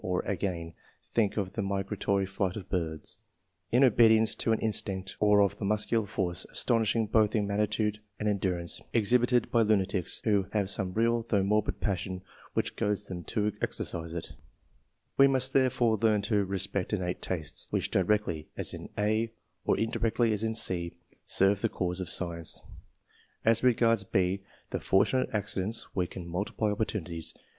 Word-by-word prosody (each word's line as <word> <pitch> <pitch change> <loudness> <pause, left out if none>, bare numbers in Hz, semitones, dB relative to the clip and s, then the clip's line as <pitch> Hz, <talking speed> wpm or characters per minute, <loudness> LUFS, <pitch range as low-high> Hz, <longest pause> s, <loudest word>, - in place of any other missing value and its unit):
or 90 -1 -1
agaiD, 90 -4 -3 0.4
think 110 -3 +1
of 95 -2 -2
the 110 - -2
migratory 100 0 -1
flight 95 -1 -2
of 95 -3 -7
birds, 80 -4 -3 0.5
in 125 +3 +5
obedience 110 -2 +5
to 115 - -1
an 110 - +3
instinct; 95 -3 -2
or 105 -1 +5
of 100 - -1
the - - -5
muscular 105 +2 +1
force, 90 -3 -2
astonishing 115 -2 +2
both 110 0 +2
in 105 -2 +2
magnitude 105 +1 0 0.2
and 105 - -1
en 105 -1 +1
durance, 90 -3 -1
exhibited 120 +2 +3
by 115 - +4
lunatics, 100 -4 +1
who 100 -3 +2
have 100 -2 0
some 95 -2 -2
real 115 +1 +2
though 100 -3 +2
morbid 105 +2 0
passion 95 -2 -2 0.3
which - - -1
goads 105 0 -1
them 90 -2 -5
to 105 +5 -1
exercise 85 0 -2
it 85 - -6 0.9
We 135 - +9
must 130 -1 +2
therefore 125 -4 +3
learn 105 -3 +3
to 105 -1 +1
re 95 +1 -2
spect 95 +1 -1
innate 90 -3 -2
tastes, 80 -5 -3
which - - -1
directly, 95 -5 +1
as - - +1
in - - -8
a, 110 +2 +1 0.3
or - - +2
indirectly, 115 0 +1
as 105 +1 -2
in 110 0 -1
c, 85 -5 0 0.3
serve 95 +1 +3
the - - +1
cause 90 0 -2
of 90 - -4
science. 85 -3 0 0.9
As 115 0 +4
regards 115 -3 +3
B, 95 -1 0 0.3
the - - -1
fortunate 100 +7 +2
accidents, 105 0 -1
we 90 -2 +1
can 90 -1 -8
multiply 100 +4 -1
opportunities. 90 -6 -3
105 Hz, 165 wpm, -29 LUFS, 95-110 Hz, 0.9 s, We